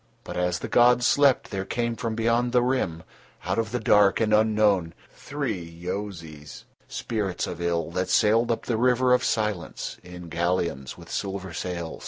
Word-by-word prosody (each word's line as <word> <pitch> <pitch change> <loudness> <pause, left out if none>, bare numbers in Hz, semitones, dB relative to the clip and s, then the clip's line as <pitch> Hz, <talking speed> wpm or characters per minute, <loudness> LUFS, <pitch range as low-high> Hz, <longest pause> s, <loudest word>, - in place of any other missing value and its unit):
But - - -7
as 90 -1 0
the - - -6
gods 120 0 +4
slept, 140 -2 +3
there 95 -1 -2
came 115 +3 -2
from 115 -1 -3
beyond 115 +2 +1
the 125 -1 +4
Rim, 110 -11 -1 0.4
out - - 0
of 110 -2 -2
the 125 - -1
dark 105 -2 +4
and 110 -1 +1
unknown, 105 -6 +2 0.2
three 135 -11 -4
Yozis, 85 -3 -7 0.2
spirits 105 -5 -3
of 85 -1 -6
ill, 85 -1 -1
that 90 +1 -2
sailed 115 +2 +3
up 115 - -2
the 115 - 0
river 125 +1 +3
of 125 - +3
Silence 105 -6 -2
in 90 -1 -10
galleons 85 -5 -2
with - - -12
silver 95 -2 -4
sails. 85 -1 -5
100 Hz, 170 wpm, -25 LUFS, 85-115 Hz, 0.4 s, gods